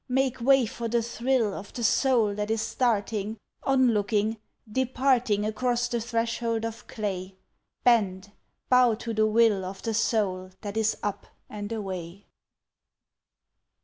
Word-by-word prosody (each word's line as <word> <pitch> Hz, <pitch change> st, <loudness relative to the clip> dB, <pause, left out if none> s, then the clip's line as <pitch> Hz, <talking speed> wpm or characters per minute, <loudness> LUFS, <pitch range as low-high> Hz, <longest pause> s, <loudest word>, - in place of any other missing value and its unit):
Make 260 Hz, -1 st, 0 dB
way 270 Hz, 0 st, +5 dB
for 230 Hz, +1 st, -5 dB
the 235 Hz, 0 st, +1 dB
thrill 235 Hz, -2 st, 0 dB
Of 200 Hz, -, -8 dB
the 240 Hz, -, -4 dB
soul 230 Hz, -2 st, +3 dB
that 210 Hz, +1 st, -3 dB
is 220 Hz, 0 st, 0 dB
starting 220 Hz, -2 st, -1 dB, 0.2 s
Onlooking 225 Hz, -4 st, +2 dB, 0.3 s
departing 250 Hz, -4 st, +1 dB
Across 240 Hz, +2 st, 0 dB
the 235 Hz, -1 st, -1 dB
threshold 230 Hz, 0 st, -1 dB
of 230 Hz, +1 st, -7 dB
clay. 195 Hz, -3 st, -4 dB, 0.5 s
Bend, 200 Hz, -5 st, +2 dB, 0.4 s
bow 250 Hz, -3 st, +5 dB
to 230 Hz, +1 st, -5 dB
the 215 Hz, 0 st, +3 dB
will 215 Hz, -3 st, +3 dB
Of 190 Hz, +1 st, -7 dB
the 225 Hz, -, -1 dB
soul 200 Hz, -4 st, 0 dB
that 205 Hz, -1 st, -6 dB
is 220 Hz, 0 st, +1 dB
up 205 Hz, -1 st, -3 dB, 0.2 s
and 205 Hz, 0 st, -6 dB
away! 190 Hz, -3 st, -5 dB
225 Hz, 135 wpm, -27 LUFS, 205-240 Hz, 0.5 s, way